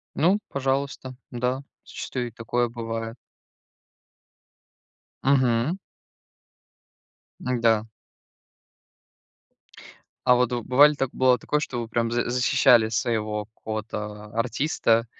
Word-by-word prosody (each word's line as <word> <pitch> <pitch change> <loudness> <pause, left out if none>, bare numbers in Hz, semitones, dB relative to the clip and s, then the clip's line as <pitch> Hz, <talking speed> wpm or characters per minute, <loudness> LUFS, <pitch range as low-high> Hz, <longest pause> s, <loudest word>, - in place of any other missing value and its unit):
Ну, 180 +6 +3
пожалуйста, 135 -1 -2 0.2
да, 125 +2 -2 0.2
зачастую 125 -2 -5
и - - -11
такое 120 +2 -1
бывает. 115 -1 -5 2.1
Мгм. 130 +4 +2 1.6
Да. 115 -3 +1 2.4
А 125 - +7
вот 125 0 +2
вы 120 -1 -1
бывали 145 +5 +6
так 135 -3 -2
бывало 130 -1 +4
ли - - -17
такое, 150 +5 -1
что 125 -5 -3
вы 115 - -5
прям 115 0 0
за 120 0 0
защищали 125 -2 +4
своего 110 -3 -1
какого-то 105 -1 -6
а 110 - -6
артиста? 115 -2 +1
120 Hz, 105 wpm, -25 LUFS, 115-130 Hz, 2.4 s, А